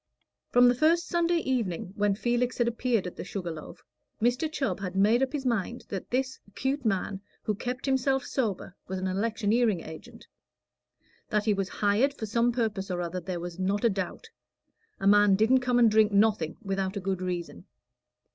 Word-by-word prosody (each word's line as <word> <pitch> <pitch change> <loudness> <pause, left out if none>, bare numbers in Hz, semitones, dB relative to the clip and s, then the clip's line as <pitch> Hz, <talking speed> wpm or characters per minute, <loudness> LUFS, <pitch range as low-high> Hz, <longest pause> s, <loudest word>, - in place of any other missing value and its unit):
From 245 0 +6
the 245 - +5
first 320 +6 +2
Sunday 345 0 +1
evening 225 - -2
when 205 -1 +1
Felix 240 +3 0
had 240 - +2
appeared 235 -3 0
at 180 - -6
the - - -5
Sugar 180 -2 -5
Loaf, 155 -1 -10 0.4
Mr. 245 +7 +1
Chubb 275 -7 -2
had 190 -2 -5
made 215 +6 +4
up 265 -1 +1
his 285 -2 -4
mind 235 -1 -1
that 195 -3 -5
this 260 +1 -1 0.2
'cute 270 +2 -1
man 195 -2 -1 0.2
who 215 - 0
kept 250 +4 -4
himself 265 -1 +1
sober 205 -7 -2
was 190 - -3
an 185 - -3
electioneering 215 +1 +1
agent. 160 0 -11 1.0
That 210 -1 0
he 215 - +3
was 195 -1 -2
hired 220 +8 +1
for 220 - -5
some 235 +3 +2
purpose 215 -5 -2
or 180 -1 -2
other 175 +1 -3
there 180 -1 -4
was 175 +1 -7
not 200 +4 0
a 230 - +4
doubt; 195 -2 -5 0.7
a - - -4
man 205 0 +6
didn't 225 +6 +4
come 250 -1 +1
and 235 -2 +5
drink 215 0 +4
nothing 200 -6 +2
without 195 0 -2
a - - -1
good 190 -1 -2
reason. 175 - -4
215 Hz, 185 wpm, -28 LUFS, 190-245 Hz, 1.0 s, From